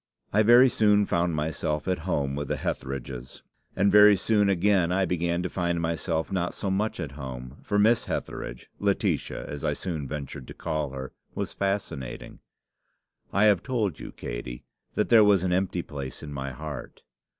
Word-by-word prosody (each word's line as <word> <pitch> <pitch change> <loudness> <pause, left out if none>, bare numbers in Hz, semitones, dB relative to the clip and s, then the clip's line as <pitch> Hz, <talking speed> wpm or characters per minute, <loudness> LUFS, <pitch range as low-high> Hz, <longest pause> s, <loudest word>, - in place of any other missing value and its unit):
"I 105 - +5
very 120 +4 +7
soon 105 -4 +4
found 85 -2 0
myself 75 0 -2
at 90 -2 0
home 70 -5 0
with 70 0 -3
the - - -1
Hetheridges; 65 -1 -5 0.3
and 100 +1 +3
very 105 0 +8
soon 105 +1 +2
again 95 -2 +3
I 95 +1 +2
began 85 0 0
to - - 0
find 85 -1 -1
myself 80 +1 -1
not 90 -2 -1
so 100 - -2
much 105 +3 -1
at 75 - -4
home; 65 -2 -7
for 100 - -1
Miss 110 +3 +4
Hetheridge - - -5
Laetitia - - 0
as 75 - -6
I - - +1
soon 80 -7 -4
ventured 70 -2 -6
to - - -9
call 75 -2 -2
her 65 -1 -7 0.2
was - - -3
fascinating. 95 -10 -3 0.9
I 100 - +3
have 105 -4 +5
told 110 - -1
you, - - -7
Katey, - - -6 0.3
that - - +1
there 115 -2 +8
was 100 -3 +4
an 90 -1 +1
empty 90 -1 0
place 70 -2 -7
in 75 -1 -7
my 70 -1 -4
heart. 75 0 -8
85 Hz, 175 wpm, -27 LUFS, 70-100 Hz, 0.9 s, very